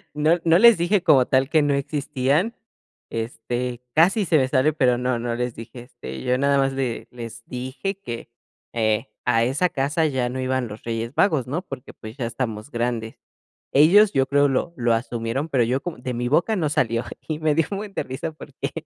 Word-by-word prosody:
No 155 +4 +3
no 165 0 +5
les 235 +2 +7
dije 175 +2 +1
como 130 -3 +5
tal 130 +1 +2
que 155 -1 +4
no 145 -1 +2
existían, 145 - 0 0.6
este, 120 +2 -4
casi 190 +6 +4
se 160 -2 +3
me 130 -3 +2
sale, 135 +3 +2
pero 125 -4 +2
no, 125 -1 -1
no 120 0 -2
les 125 0 -3
dije. 115 +2 -9
Este, 65 - -9
yo 125 0 +1
nada 140 +1 +2
más 135 0 +1
le 130 -3 -3
les 115 -1 -9
dije 130 +10 -4
que, 120 -14 -7 0.4
eh, 110 -2 0 0.2
a 115 - +3
esa 140 +9 +1
casa 145 +4 0
ya 130 -4 -1
no 130 +1 -4
iban 130 -1 -1
los 105 0 -10
Reyes 115 +1 -3
Magos, 155 - +2
¿no? 150 +7 -2
Porque, 180 -8 -9
pues, 110 +3 -11
ya 125 - -2
estamos 115 +1 -4
grandes. 115 -1 -3 0.5
Ellos, 190 +9 +6
yo 135 - +3
creo, 145 0 +3
lo 140 +5 -1
lo 120 -1 +2
asumieron, 115 +4 -2
pero 130 -5 +2
yo 125 +3 0
como 175 -8 -6
de 125 0 -4
mi 120 +1 -2
boca 175 - +2
no 160 -6 0
salió, 115 -4 0 0.2
y 155 - -2
me 155 -1 +2
dio 165 0 +3
un 200 - -2
buen 205 -1 -7
de - - -1
risa 140 +5 -5
porque 140 -2 -7
130 Hz, 205 wpm, -23 LUFS, 120-155 Hz, 0.6 s, les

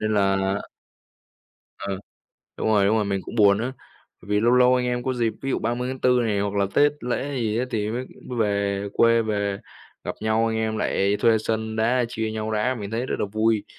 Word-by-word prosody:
nên 110 0 0
là 95 0 +1 1.2
Ờ, 100 -1 -4 0.6
đúng - - 0
rồi, 105 -2 +4
đúng 110 +3 +3
rồi, 105 - +1
mình 100 -1 -1
cũng - - -8
buồn 100 -3 +5
á, 125 +4 -2 0.5
bởi 100 - -15
vì 105 - +3
lâu 120 +2 +3
lâu 125 0 +5
anh 125 0 0
em 125 0 -1
có 130 - 0
dịp, 115 -2 0
ví 135 - -2
dụ - - +1
30/4 125 +2 0
này 105 -3 0
hoặc 100 0 -2
là 100 -1 +2
Tết 145 0 +5
lễ 130 +3 -2
gì 110 -3 0
á, 125 - +1
thì 105 -3 -1
mới 125 +3 -3 0.2
mới 125 - -4
về 100 -2 0
quê, 115 0 +4
về 100 -2 -1 0.5
gặp - - -3
nhau, 110 +1 +1
anh 110 0 -1
em 110 0 -1
lại 100 +1 +1
thuê 115 -2 +4
sân 110 0 -2
đá, 120 +3 +2
chia 110 -1 -3
nhau 110 0 -3
đá, 110 +4 +1
mình 105 -4 -6
thấy 115 +3 -2
rất - - -2
là - - 0
vui. 110 -1 +1
110 Hz, 220 wpm, -24 LUFS, 105-120 Hz, 1.2 s, buồn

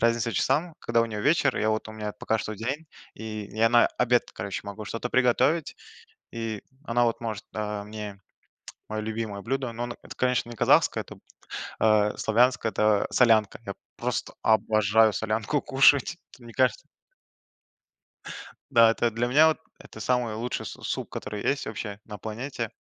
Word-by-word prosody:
разница 115 0 +2
часам, 155 +5 +1
когда 115 0 +1
у 115 - +2
нее 105 -2 -5
вечер, 145 -1 +3
я 110 0 +1
вот, 110 0 -2
у 110 - -8
меня 105 -1 -5
пока 115 -2 0
что 110 0 -4
день. 135 +9 -4 0.3
И 110 -1 -6
я 115 +1 +4
на 120 -1 +6
обед, 125 0 +2
короче, 100 - -4
могу 100 +1 -7
что-то 115 +4 -4
приготовить, 130 +6 +2 0.6
и 115 -3 -4 0.2
она 120 -1 +2
вот 115 0 0
может, 110 -4 -4
а, 105 -1 -3
мне 105 -2 -7 0.7
мое 110 0 -3
любимое 110 -2 -4
блюдо, 130 0 -2
но 120 +1 -4
оно, 120 - -6
это, - - -11
конечно, 125 -2 0
не 120 - -8
казахское, - - +3
это - - -12 0.6
а 105 -1 +3
славянское. 120 +1 +2
Это 105 -1 +2
солянка. 110 -5 +3
Я 100 - -4 0.2
просто - - -3
обожаю 110 0 +4
солянку 110 +6 -1
кушать! 140 +3 +4 0.2
Вот 125 - -17
мне 115 - -11
кажется. 130 +1 +1 1.8
Да, 115 -3 +7
это 115 +1 +1
для 115 +2 -1
меня 150 +6 +6
вот, 160 - 0 0.2
это 110 - -13
самый 120 -1 0
лучший 120 +3 -3
су - - -9
суп, - - -3
который 105 -1 -5
есть 140 0 0
вообще 105 -1 -5
на 105 -2 -9
планете. 115 +2 -5
115 Hz, 170 wpm, -26 LUFS, 110-125 Hz, 1.8 s, Да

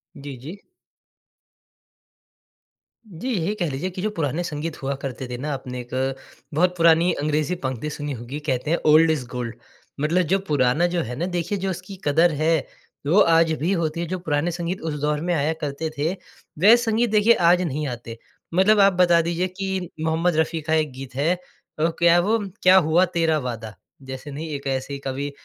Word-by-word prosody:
जी, 140 -1 -8
जी। 155 +11 -9 2.5
जी, 200 +6 -6
यही 185 +1 -1
कह 175 -6 -1
लीजिए 145 +8 -3
कि 180 0 -7
जो 215 - 0
पुराने 165 -3 -2
संगीत 155 -1 -5
हुआ 135 +1 -2
करते 130 -1 -5
थे 125 - -4
ना 145 +4 -4
आपने 125 -2 -6
एक, 130 +2 -2 0.4
बहुत 180 +4 +2
पुरानी 165 +1 +5
अंग्रेज़ी 155 +3 0
पंक्ति 130 +3 -3
सुनी 145 -1 -4
होगी, 125 +5 -6
कहते 145 0 -2
हैं 170 - +3
ओल्ड 160 +1 +6
इज़ 140 -6 -2
गोल्ड। 120 -2 -4 0.4
मतलब 165 +5 +2
जो 195 - +4
पुराना 145 +3 +2
जो 175 -1 -1
है 125 +2 -5
ना 170 - -2
देखिए 180 +2 -2
जो 190 0 -2
उसकी 185 +2 -6
क़द्र 165 +4 +4
है, 155 -1 +1 0.4
वो 185 +7 +4
आज 165 -2 +5
भी 175 +5 +1
होती 165 -2 -1
है। 170 - -1
जो 185 +1 -3
पुराने 160 +1 -1
संगीत 175 +2 -4
उस 160 -2 -3
दौर 150 0 0
में 175 +1 0
आया 155 +1 +1
करते 150 +3 -3
थे, 155 +4 0 0.5
वह 215 +6 +8
संगीत 235 -1 +1
देखिए 215 +2 +5 0.2
आज 180 +1 +4
नहीं 150 -3 -2
आते। 115 -2 -7 0.4
मतलब 205 +4 +4
आप 195 -1 +6
बता 175 -2 +4
दीजिए 170 +2 -1
कि 190 -2 -3
मोहम्मद 160 +1 +1
रफ़ी 160 0 0
का 155 +1 -2
एक 155 -3 +1
गीत 130 -1 -9
है 155 +6 +2 0.5
ओह 165 - +3
क्या 170 0 +5
वो 215 +6 +2 0.3
क्या 185 +1 +7
हुआ 170 +2 +4
तेरा 165 -2 +2
वादा। 115 -5 -6 0.3
जैसे 130 +2 -7
नहीं 155 +4 -6
एक 140 - -7
ऐसे 135 +1 -2
ही 140 - -5
कवि 140 +1 -4
160 Hz, 195 wpm, -23 LUFS, 140-175 Hz, 2.5 s, वह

